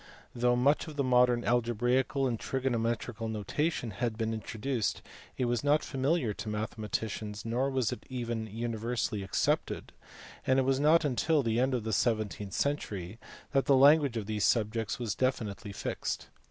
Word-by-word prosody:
Though 120 0 +2
much 140 +7 +2
of 155 - -8
the 140 - 0
modern 125 -1 +4
algebraical 120 +3 +1
and 120 -4 -1
trigonometrical 120 -3 -1
notation 115 +4 -2
had 110 +2 -2
been 115 -1 -1
introduced, 110 +2 -2 0.3
it 125 - +1
was 120 +1 0
not 145 +1 +3
familiar 135 -3 0
to 110 - -6
mathematicians, 105 0 -4
nor 125 +4 0
was 130 -4 0
it - - -7
even 120 -3 -3
universally 115 0 -2
accepted; 95 - -1 0.5
and 130 - +4
it 135 - +4
was 135 0 +2
not 155 +2 +5
until 145 +2 +2
the 115 0 +1
end 130 +1 +2
of 120 - -2
the 110 0 -2
seventeenth 105 -3 0
century 110 -8 -2 0.3
that 135 -1 +2
the 140 - +5
language 140 -2 +6
of 110 - -3
these 105 0 -2
subjects 115 +2 +1
was 120 -4 -2
definitely 110 -5 -2
fixed. - - -4
120 Hz, 160 wpm, -30 LUFS, 110-130 Hz, 0.5 s, language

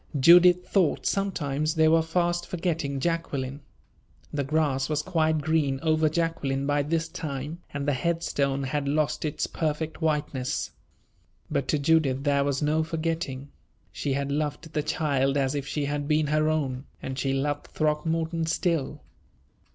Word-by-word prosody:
Judith 180 +4 +7
thought 185 -6 +1
sometimes 155 -6 -1
they 160 0 +4
were 165 +1 +5
fast 175 +1 0
forgetting 165 -6 -2
Jacqueline. 145 -4 -2 0.7
The 145 -1 0
grass 140 -2 0
was 150 -1 0
quite 160 -3 +1
green 145 -3 +1
over 155 -1 +3
Jacqueline 150 -4 -1
by 145 0 +2
this 160 +3 -1
time, 150 +1 -5
and 145 0 -4
the 145 - +3
head 170 +5 -1
stone 140 -2 0
had 140 +1 -2
lost 150 +1 0
its 150 - -1
perfect 160 +1 -3
whiteness. 145 -5 -1 0.8
But 135 - 0
to 150 - +2
Judith 140 -3 +2
there 140 -1 +2
was 140 +1 -1
no 155 +2 +2
forgetting. 160 -4 -3 0.4
She 140 - -2
had 140 +1 -1
loved 150 +2 -3
the 150 - +1
child 145 -3 0
as 135 -1 +1
if 140 -1 -3
she 145 +1 -2
had 145 0 -2
been 155 0 +2
her 155 +1 +2
own, 135 -4 -1
and 130 0 -5
she 135 +1 0
loved 145 +2 -1
Throckmorton 160 +2 -1
still. 165 -3 -1
150 Hz, 155 wpm, -26 LUFS, 140-160 Hz, 0.8 s, Judith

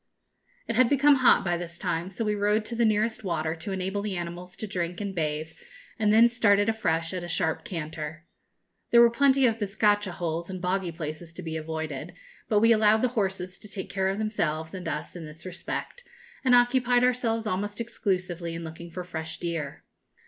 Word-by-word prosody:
It 230 - -2
had 250 0 +5
become 285 0 +5
hot 255 -5 +5
by 175 -1 +1
this 170 -1 -6
time, 175 0 -2
so 220 +4 -3
we 210 - +1
rode 210 +1 +1
to 235 - -4
the 235 0 +3
nearest 220 +1 +1
water, 160 -4 -1
to 180 +5 -5
enable 190 +1 -2
the 200 -3 -3
animals 175 +1 -6
to 215 - -5
drink 180 -3 -3
and 200 -2 -3
bathe, 155 -2 -2 0.5
and 210 -1 +3
then 225 +2 +7
started 205 -4 +3
afresh 165 -7 0
at 180 -1 -3
a - - -5
sharp 165 -2 0
canter. 160 -1 -6 0.6
There 235 - +6
were 235 0 +7
plenty 270 +2 +4
of 225 -2 +2
bizcacha 205 -1 +1
holes 170 0 -3
and 185 -1 -5
boggy 180 0 -1
places 160 0 -6
to 185 - -8
be 160 -1 -4
avoided; 160 0 -5 0.3
but 210 -1 +3
we 230 +1 +6
allowed 220 0 +4
the 255 - +3
horses 190 -5 -2
to - - -10
take 190 -1 -5
care 190 -1 0
of 195 - -2
themselves 160 -8 -1
and 185 -2 -6
us 150 - -4
in 165 -3 -7
this 155 +3 -11
respect, 340 - -5 0.4
and 255 -2 +5
occupied 245 0 +4
ourselves 240 -3 +1
almost 205 +1 -2
exclusively 185 -7 -2
in 165 - -5
looking 165 +1 -8
for 180 +2 -6
fresh 160 -2 -5
deer. 160 -4 -4
190 Hz, 200 wpm, -27 LUFS, 170-220 Hz, 0.6 s, then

